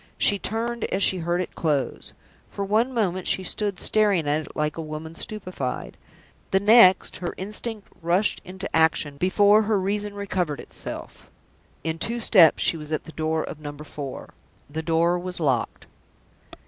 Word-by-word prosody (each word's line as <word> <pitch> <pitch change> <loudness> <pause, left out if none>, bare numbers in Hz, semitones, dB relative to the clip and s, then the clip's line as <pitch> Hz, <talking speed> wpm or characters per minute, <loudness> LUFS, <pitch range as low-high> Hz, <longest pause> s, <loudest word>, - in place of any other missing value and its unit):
She 200 - +3
turned 230 +3 -2
as 195 - 0
she 185 - +3
heard 175 +2 0
it - - -10
close. 145 -6 -2 0.3
For 200 - -4
one 220 +6 +2
moment 185 -7 -1
she 190 - +1
stood 200 0 -2
staring 205 -7 +2
at 150 +2 +1
it - - -14
like 150 0 -1
a 165 - -4
woman 155 +1 -7
stupefied. 185 -9 -5 0.5
The 190 - +3
next, 200 -3 +6
her 175 - -5
instinct 210 +2 -5
rushed 175 +5 +1
into 190 +2 -7
action, 160 -3 +2
before 205 +5 +4
her 215 -1 +1
reason 205 +2 -2
recovered 185 -7 -2
itself. - - -8 0.5
In 160 0 -2
two 235 +5 -1
steps 185 -8 +5
she 165 - +3
was 150 -1 -8
at 155 - -1
the 160 - -11
door 160 0 -1
of 155 - -7
Number 145 0 -8
Four. 140 -2 -8 0.3
The 155 +3 -4
door 170 +2 +2
was 180 0 -5
locked. 135 -7 -1
180 Hz, 165 wpm, -24 LUFS, 160-205 Hz, 0.5 s, next